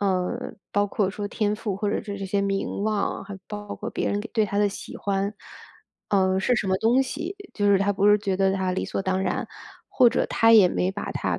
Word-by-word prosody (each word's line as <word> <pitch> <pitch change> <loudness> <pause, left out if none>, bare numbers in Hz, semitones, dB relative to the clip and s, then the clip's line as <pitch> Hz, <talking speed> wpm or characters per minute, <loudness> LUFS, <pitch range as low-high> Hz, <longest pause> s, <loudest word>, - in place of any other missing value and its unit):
嗯， 195 +5 -1 0.2
包 205 0 +2
括 200 -1 0
说 205 +1 -4
天 210 0 -1
赋 210 -3 -3
或 205 0 -1
者 - - -1
是 205 -1 -6
这 195 - -4
些 200 +1 0
名 195 0 -2
望， 215 -2 -1
还 200 0 -8
包 205 -1 -6
括 - - -5
别 - - -2
人 205 - 0
对 220 -2 +2
她 200 0 -2
的 205 0 +3
喜 200 - -8
欢， 200 0 -1 0.8
嗯， 190 -1 +2
是 245 +6 +2
什 210 - -1
么 190 - +2
东 240 +4 +3
西， 330 +7 -5 0.2
就 205 - -1
是 195 - +5
她 200 +1 +1
不 200 0 +1
是 210 0 +6
觉 200 -2 -1
得 190 0 +2
她 190 -1 -1
理 185 - -2
所 - - -3
当 190 0 0
然， - - -2 0.4
或 250 -2 +5
者 - - 0
她 225 0 +4
也 210 -5 +8
没 180 +1 0
把 205 - -5
它 - - -2
200 Hz, 255 characters per minute, -25 LUFS, 195-210 Hz, 0.8 s, 也